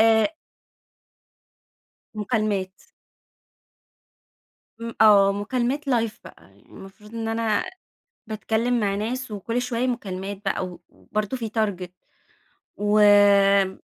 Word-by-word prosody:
آآ 225 Hz, +7 st, +4 dB, 1.8 s
مكالمات. 210 Hz, -3 st, -1 dB, 2.1 s
م 230 Hz, 0 st, -6 dB
آه، 200 Hz, -2 st, +6 dB
مكالمات 245 Hz, +7 st, -2 dB
لايف 230 Hz, -4 st, 0 dB
بقى -, -, -15 dB
المفروض 210 Hz, +3 st, -15 dB
إن 225 Hz, -1 st, -3 dB
أنا 225 Hz, -2 st, 0 dB, 0.6 s
باتكلم 225 Hz, +2 st, -1 dB
مع 200 Hz, -2 st, 0 dB
ناس، 235 Hz, +4 st, -4 dB
وكل 230 Hz, +4 st, -3 dB
شوية 245 Hz, 0 st, -1 dB
مكالمات 200 Hz, -4 st, -4 dB
بقى 195 Hz, -1 st, -1 dB
و 180 Hz, -1 st, -10 dB
وبرضه 215 Hz, +4 st, -4 dB
في 225 Hz, -2 st, -4 dB
تارجت، 200 Hz, -5 st, -2 dB, 0.8 s
وآمم 205 Hz, -2 st, +4 dB
215 Hz, 95 wpm, -24 LUFS, 200-230 Hz, 2.1 s, آه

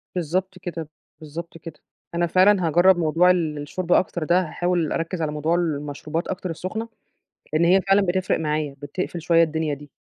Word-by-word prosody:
بالضبط 185 Hz, +2 st, -2 dB
كده، 165 Hz, -3 st, -6 dB, 0.3 s
بالضبط 165 Hz, +2 st, -8 dB
كده، 160 Hz, -2 st, -11 dB, 0.4 s
أنا 170 Hz, 0 st, +1 dB
فعلًا 185 Hz, +1 st, +4 dB
هاجرّب 175 Hz, +4 st, +5 dB
موضوع 170 Hz, +2 st, +4 dB
ال 165 Hz, -4 st, 0 dB
الشرب 170 Hz, +5 st, -5 dB
أكتر 175 Hz, -2 st, +2 dB
ده 175 Hz, +4 st, +3 dB
هاحاول 175 Hz, -1 st, -1 dB
أركّز 165 Hz, +1 st, -2 dB
على 155 Hz, -2 st, -1 dB
موضوع 155 Hz, +3 st, 0 dB
المشروبات 155 Hz, 0 st, -2 dB
أكتر 185 Hz, -1 st, -4 dB
السخنة 185 Hz, +7 st, -5 dB, 0.6 s
لإن 160 Hz, +2 st, +3 dB
هي 185 Hz, +3 st, +5 dB
فعلًا 195 Hz, +1 st, +3 dB
بتفرق 185 Hz, -1 st, 0 dB
معايا، 150 Hz, -2 st, -2 dB
بتقفل 170 Hz, +4 st, -4 dB
شوية 165 Hz, 0 st, +4 dB
الدنيا 160 Hz, -1 st, -1 dB
دي. 145 Hz, +1 st, -9 dB
170 Hz, 170 wpm, -23 LUFS, 155-180 Hz, 0.6 s, هاجرّب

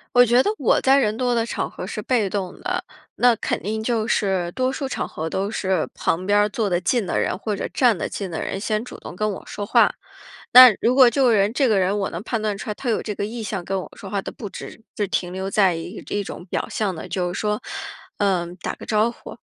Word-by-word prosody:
我 245 Hz, 0 st, +8 dB
觉 240 Hz, +2 st, +4 dB
得 405 Hz, -, +1 dB
我 -, -, +3 dB
在 270 Hz, +1 st, +4 dB
人 220 Hz, -5 st, +1 dB
多 245 Hz, -1 st, +1 dB
的 230 Hz, -1 st, +1 dB
场 -, -, -3 dB
合 -, -, -7 dB
是 215 Hz, -, -5 dB
被 220 Hz, -3 st, +1 dB
动 190 Hz, -2 st, -4 dB
的， -, -, -2 dB, 0.3 s
那 245 Hz, -1 st, +4 dB
肯 -, -, -2 dB
定 220 Hz, +2 st, -3 dB
就 225 Hz, -2 st, 0 dB
是 190 Hz, -6 st, +1 dB
多 255 Hz, 0 st, 0 dB
数 270 Hz, +1 st, -3 dB
场 -, -, -3 dB
合 160 Hz, +1 st, -5 dB
都 195 Hz, +5 st, -2 dB
是 190 Hz, -6 st, 0 dB
旁 175 Hz, +3 st, -1 dB
边 205 Hz, +1 st, +3 dB
儿 205 Hz, -, +4 dB
坐 210 Hz, 0 st, -1 dB
得 175 Hz, -1 st, +1 dB
近 210 Hz, +5 st, 0 dB
的 -, -, -1 dB
人， -, -, -1 dB
或 210 Hz, +2 st, -3 dB
者 200 Hz, -, -3 dB
站 240 Hz, -6 st, +3 dB
得 -, -, -2 dB
近 195 Hz, -3 st, -5 dB
的 160 Hz, -, -3 dB
人 -, -, -3 dB
先 215 Hz, +1 st, -1 dB
主 -, -, -9 dB
动 -, -, -9 dB
跟 215 Hz, +4 st, -1 dB
我 -, -, -8 dB
说 205 Hz, -, -5 dB
话。 -, -, +4 dB, 0.6 s
那 255 Hz, 0 st, +11 dB
如 245 Hz, -, +3 dB
果 260 Hz, -2 st, +8 dB
这 255 Hz, +4 st, +1 dB
个 245 Hz, -3 st, +5 dB
人 200 Hz, 0 st, +3 dB
这 275 Hz, 0 st, +3 dB
个 215 Hz, -5 st, +3 dB
人， 190 Hz, +2 st, +1 dB
我 195 Hz, -, -1 dB
能 170 Hz, -, -5 dB
判 225 Hz, 0 st, -2 dB
断 210 Hz, -2 st, -1 dB
出 235 Hz, -, -7 dB
来 210 Hz, -, -2 dB
他 245 Hz, +3 st, -3 dB
有 220 Hz, -, +1 dB
这 210 Hz, -, -4 dB
个 200 Hz, -, -3 dB
意 225 Hz, +2 st, -5 dB
向 195 Hz, -4 st, -4 dB
跟 195 Hz, +1 st, -2 dB
我 -, -, -9 dB
说 195 Hz, -, -9 dB
话 200 Hz, 0 st, -1 dB
的 -, -, -6 dB
不 210 Hz, -4 st, -8 dB
只 225 Hz, -, -9 dB, 0.2 s
是 205 Hz, -2 st, 0 dB
停 180 Hz, -1 st, -2 dB
留 190 Hz, +1 st, -4 dB
在 195 Hz, -3 st, +3 dB
一 165 Hz, +2 st, -7 dB
这 205 Hz, -, -3 dB
种 180 Hz, -, -8 dB
表 185 Hz, -, -3 dB
象 205 Hz, -4 st, -1 dB
的， 160 Hz, -, -8 dB
就 180 Hz, -2 st, -2 dB
是 -, -, -4 dB
说， 210 Hz, 0 st, -1 dB, 0.6 s
呃 190 Hz, -4 st, +1 dB
打 -, -, -3 dB
个 -, -, -11 dB
招 215 Hz, +1 st, +2 dB
呼， -, -, -11 dB
210 Hz, 285 characters per minute, -22 LUFS, 190-235 Hz, 0.6 s, 那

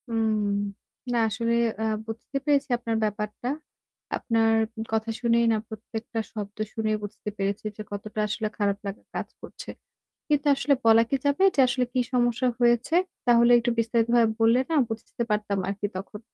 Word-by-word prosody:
হুম, 225 Hz, -1 st, +1 dB, 0.8 s
না -, -, +2 dB
আসলে 230 Hz, +2 st, -1 dB, 0.3 s
আ -, -, 0 dB, 0.2 s
বুঝতে 225 Hz, +5 st, -5 dB
পেরেছি 285 Hz, -1 st, +2 dB
আপনার 230 Hz, -1 st, -2 dB
ব্যাপারটা। 210 Hz, +2 st, -3 dB, 0.7 s
আপনার 225 Hz, -2 st, +2 dB, 0.4 s
কথা 220 Hz, 0 st, 0 dB
শুনেই 235 Hz, -1 st, +3 dB
না 220 Hz, -, +2 dB
প্রত্যেকটা 220 Hz, +1 st, -6 dB
শব্দ 205 Hz, -2 st, -6 dB, 0.2 s
শুনেই 215 Hz, -1 st, 0 dB
বুঝতে 210 Hz, 0 st, -6 dB
পেরেছি 200 Hz, +1 st, -2 dB
যে -, -, -5 dB
কতটা 210 Hz, +1 st, -5 dB
আসলে 215 Hz, +1 st, -2 dB
খারাপ 200 Hz, -2 st, +1 dB
লাগা 195 Hz, -, -6 dB
কাজ -, -, -3 dB
করছে। -, -, -10 dB, 0.6 s
কিন্তু 295 Hz, -1 st, +1 dB
আসলে 280 Hz, +1 st, +2 dB
বলা 225 Hz, 0 st, +7 dB
কি 275 Hz, -, +3 dB
যাবে 285 Hz, +6 st, +2 dB
যে -, -, +3 dB
আসলে 250 Hz, 0 st, +1 dB
কি 255 Hz, -, +1 dB
সমস্যা 245 Hz, 0 st, +2 dB
হয়েছে? 240 Hz, +5 st, +3 dB, 0.3 s
তাহলে 235 Hz, 0 st, +5 dB
একটু 240 Hz, +1 st, 0 dB
বিস্তারিতভাবে 230 Hz, 0 st, +3 dB
বললে 230 Hz, +2 st, +5 dB
না -, -, +1 dB
বুঝতে 225 Hz, +1 st, -5 dB
পারতাম 210 Hz, -1 st, 0 dB
আরকি 200 Hz, +1 st, -2 dB
তখন। 200 Hz, +2 st, -7 dB
225 Hz, 160 wpm, -26 LUFS, 215-240 Hz, 0.8 s, বলা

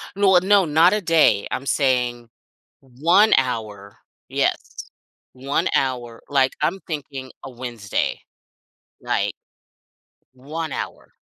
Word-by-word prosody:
No 195 Hz, -2 st, +4 dB
a 180 Hz, -, +6 dB
no 195 Hz, 0 st, +4 dB
not 160 Hz, +3 st, +4 dB
a 210 Hz, -, 0 dB
day, 160 Hz, -, +3 dB
I'm 135 Hz, -, -3 dB
saying 125 Hz, -4 st, 0 dB, 0.5 s
1 165 Hz, -, +3 dB
hour, 110 Hz, -6 st, -3 dB, 0.3 s
yes. -, -, -2 dB, 0.4 s
1 140 Hz, +7 st, -1 dB
hour, 120 Hz, -3 st, -2 dB
like, 135 Hz, -2 st, +2 dB
I'm 165 Hz, +6 st, 0 dB
thinking 140 Hz, -5 st, -6 dB
a 135 Hz, -, -8 dB
Wednesday, 120 Hz, -5 st, -3 dB, 0.8 s
like -, -, -1 dB, 1.0 s
1 150 Hz, +4 st, -6 dB
hour. -, -, -7 dB
135 Hz, 110 wpm, -22 LUFS, 125-165 Hz, 1.0 s, a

